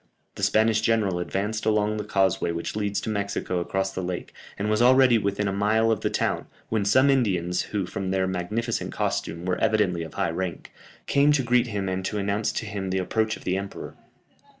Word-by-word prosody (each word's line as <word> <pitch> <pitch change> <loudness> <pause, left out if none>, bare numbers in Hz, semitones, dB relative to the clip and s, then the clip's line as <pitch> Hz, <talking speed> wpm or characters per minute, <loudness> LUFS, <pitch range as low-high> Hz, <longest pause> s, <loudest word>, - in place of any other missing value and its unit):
The - - -9
Spanish 110 0 +3
general 110 -5 +1
advanced 105 +5 -2
along 105 0 +1
the 105 - -3
causeway 95 -4 +1
which 85 +3 -4
leads 105 -1 -1
to - - -4
Mexico 100 -3 -2
across 95 +2 -2
the 95 - -3
lake, 90 -1 -5 0.2
and 100 - -2
was 110 +1 +1
already 130 -1 +6
within 100 0 -1
a 100 - -1
mile 110 +3 +2
of 110 - +1
the - - 0
town, - - -1 0.2
when 110 -2 0
some 130 +7 +5
Indians, 90 -9 +1
who, 100 -3 -1
from 95 +1 -4
their 95 0 +1
magnificent 95 +5 -2
costume 85 +2 -2
were 90 -1 -1
evidently 105 -6 +2
of 80 -2 -8
high - - 0
rank, 90 +1 -4 0.3
came 145 +1 +4
to 140 -3 +2
greet 120 0 +3
him 100 -4 -3
and 95 0 -2
to 105 - -2
announce 100 +1 0
to - - -3
him 100 -3 -4
the 95 - 0
approach 110 +4 0
of - - -15
the 90 - 0
emperor. 100 0 -6
100 Hz, 205 wpm, -25 LUFS, 95-110 Hz, 0.3 s, already